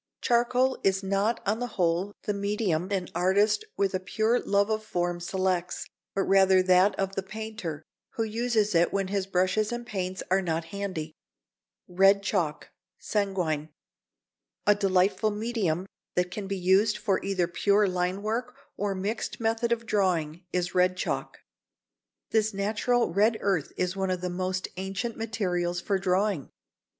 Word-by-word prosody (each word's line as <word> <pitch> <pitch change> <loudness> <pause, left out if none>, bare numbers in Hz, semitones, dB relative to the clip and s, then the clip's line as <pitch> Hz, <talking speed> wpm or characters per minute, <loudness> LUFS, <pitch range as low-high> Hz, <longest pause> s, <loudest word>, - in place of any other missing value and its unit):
Charcoal 250 +2 +2
is 195 0 +2
not 200 +4 0
on 210 +3 0
the 245 - -2
whole 180 +3 +1
the 210 - -1
medium 200 -4 -1
an 190 -3 -1
artist 200 - +2
with 200 -1 +1
a 185 - 0
pure 220 +5 +1
love 200 +1 +1
of 215 0 -1
form 175 -4 -2
selects, 185 0 -1 0.3
but 195 - +2
rather 190 -1 +5
that 185 +2 +4
of 195 0 -1
the 195 - -1
painter, 210 -6 -6 0.3
who 225 - 0
uses 220 -1 0
it 170 0 +3
when 195 -1 -1
his 195 -1 -1
brushes 185 +4 +1
and 240 0 -4
paints 185 -4 -3
are 190 +1 +4
not 165 -2 -2
handy. 185 -6 -4 0.7
[Sidenote: 180 +1 -15
Red 195 +1 +6
Chalk 170 -7 -1 0.3
(Sanguine).] 180 -7 -1 1.0
A 205 - +6
delightful 195 0 +2
medium 210 -5 -1 0.3
that 180 0 +1
can 195 +1 -5
be 195 0 -2
used 190 +4 +3
for 200 -3 0
either 195 -3 +1
pure 200 +4 +2
line 180 +2 -1
work 240 +4 -2 0.2
or 205 -1 -1
a - - -6
mixed 200 +4 -3
method 225 +1 0
of 230 -1 0
drawing, 180 -6 0
is 180 -1 -1
red 185 0 +3
chalk. - - -3 0.9
This 220 -2 +2
natural 215 +1 +1
red 215 +4 +3
earth 190 -7 0
is 180 +1 -1
one 190 -1 -1
of 180 -1 -1
the 180 -1 -2
most 185 +1 -2
ancient 195 +5 -3
materials 180 -6 -1
for 195 +2 0
drawing. 190 -4 0
195 Hz, 160 wpm, -27 LUFS, 180-215 Hz, 1.0 s, Red